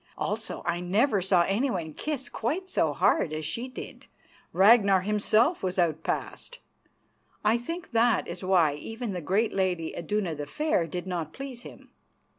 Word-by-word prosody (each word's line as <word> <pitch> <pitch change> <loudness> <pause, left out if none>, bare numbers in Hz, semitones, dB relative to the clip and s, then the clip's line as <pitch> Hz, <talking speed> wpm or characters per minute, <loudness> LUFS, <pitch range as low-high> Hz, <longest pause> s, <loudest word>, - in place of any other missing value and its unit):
Also, - - -3
I 175 0 0
never 200 +5 +2
saw 180 -1 +3
anyone 195 - -1
kiss 285 - -4
quite 345 +11 -3
so - - +2
hard 170 - +2
as 155 0 -4
she 235 - -3
did; 255 - -10 0.4
Ragnar 200 -1 +5
himself 215 - +2
was 185 0 -2
outpassed. 170 - -2 0.9
I 220 +3 +4
think 330 +7 -6
that 230 0 +2
is 175 +2 -7
why 180 -6 +3
even 225 - -5
the 180 - -4
great 200 +9 +1
lady, 180 -4 -1
Iduna 185 0 -2
the 145 -1 -6
Fair, 300 - 0
did 180 +2 -5
not 170 -4 -4
please 270 -3 -7
him. - - -13
195 Hz, 155 wpm, -27 LUFS, 175-240 Hz, 0.9 s, Ragnar